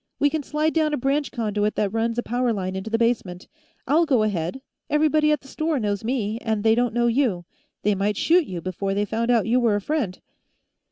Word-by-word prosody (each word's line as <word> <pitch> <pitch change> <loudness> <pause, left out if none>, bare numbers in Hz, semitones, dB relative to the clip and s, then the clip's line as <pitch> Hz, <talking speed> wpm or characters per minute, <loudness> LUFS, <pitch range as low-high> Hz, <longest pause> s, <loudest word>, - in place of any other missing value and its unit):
"We 290 0 +2
can 315 - -1
slide 305 +2 -1
down 310 -2 +1
a - - -4
branch 275 +3 0
conduit 210 -3 -1
that 205 -1 -1
runs 230 +1 0
a 240 - 0
power 245 +1 0
line 190 -3 -3
into 190 +3 -4
the 225 - +1
basement. 225 -6 -1 0.4
I'll 320 +5 +3
go 255 -7 +3
ahead; 205 +4 -2 0.3
everybody 305 0 +3
at 300 - +1
the 270 - -16
store 310 +1 -1
knows 205 -2 -2
me, 225 -2 -1
and 220 -3 -1
they 220 0 +5
don't 240 0 0
know 240 0 +2
you. 235 -8 +1 0.4
They 210 - +3
might 200 +1 -1
shoot 340 -1 +3
you 175 -2 -5
before 195 +2 -3
they 205 +1 +1
found 230 +3 -2
out 230 -5 +3
you 240 +4 +2
were 230 -4 +2
a - - +1
friend." 235 -8 -2
230 Hz, 225 wpm, -23 LUFS, 205-280 Hz, 0.4 s, they